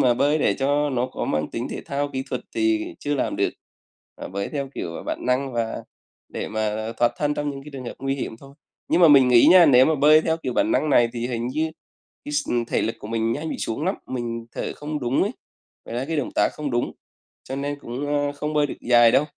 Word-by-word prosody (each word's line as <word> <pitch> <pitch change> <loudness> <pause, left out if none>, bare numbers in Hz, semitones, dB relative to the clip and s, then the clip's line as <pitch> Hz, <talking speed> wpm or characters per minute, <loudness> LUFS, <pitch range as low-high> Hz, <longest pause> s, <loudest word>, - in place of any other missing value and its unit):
mà 125 -2 +4
bơi 145 +4 +2
để - - +2
cho 145 +2 +1
nó 125 -1 0
có 130 - -5
mang 75 0 -1
tính 120 +2 -4
thể - - -5
thao 145 -1 -2
kỹ 130 - -2
thuật - - -2
thì 330 0 0
chưa 145 0 -2
làm 135 - -1
được, - - +1 0.7
à, - - -7
bơi 100 +1 -3
theo 140 -2 -3
kiểu 85 -1 -5
bản - - -4
năng 130 +1 0
và 115 -1 -2 0.5
để - - -5
mà 110 +1 -2
thoát 120 0 +2
thân 150 0 0
trong 145 0 -2
những 135 -1 -7
cái 150 - -11
trường 130 -2 -7
hợp - - -6
nguy 135 0 -1
hiểm 135 -4 -5
thôi. 135 +3 -15 0.3
Nhưng 175 - +3
mà 170 - +8
mình 135 -3 +7
nghĩ 120 -1 +6
nha, 180 -2 +8
nếu 130 -2 +6
mà 160 - +2
bơi 150 +2 +6
theo 160 0 +1
kiểu 165 - -4
bản 300 +2 +1
năng 155 - +1
này 120 -3 +5
thì 120 0 -3
hình 120 -1 -3
như 155 +5 -1 0.5
cái 145 - -6
x 145 -1 -1
ừm, 120 -1 +1
thể - - -1
lực 115 - -2
của 105 - -9
mình 115 0 0
nhanh 155 +5 -4
bị - - -4
xuống 115 +8 -3
lắm, 190 - +1
mình 115 -2 -4
thở - - -4
không 150 0 -4
đúng 125 +1 +1
ấy, 205 - 0 0.5
ngoài 120 - -4
ra 130 - -2
cái 165 - -1
động 140 - -1
tác - - +3
không 150 -2 -4
đúng, 120 0 -1 0.6
cho 135 - -4
nên 145 +1 -3
cũng, 130 +5 -5
ơ, 145 0 0
không 150 +1 -4
bơi 150 -1 +3
được - - -6
dài 120 -1 +5
đâu. 145 - +4
135 Hz, 255 wpm, -23 LUFS, 120-150 Hz, 0.7 s, mà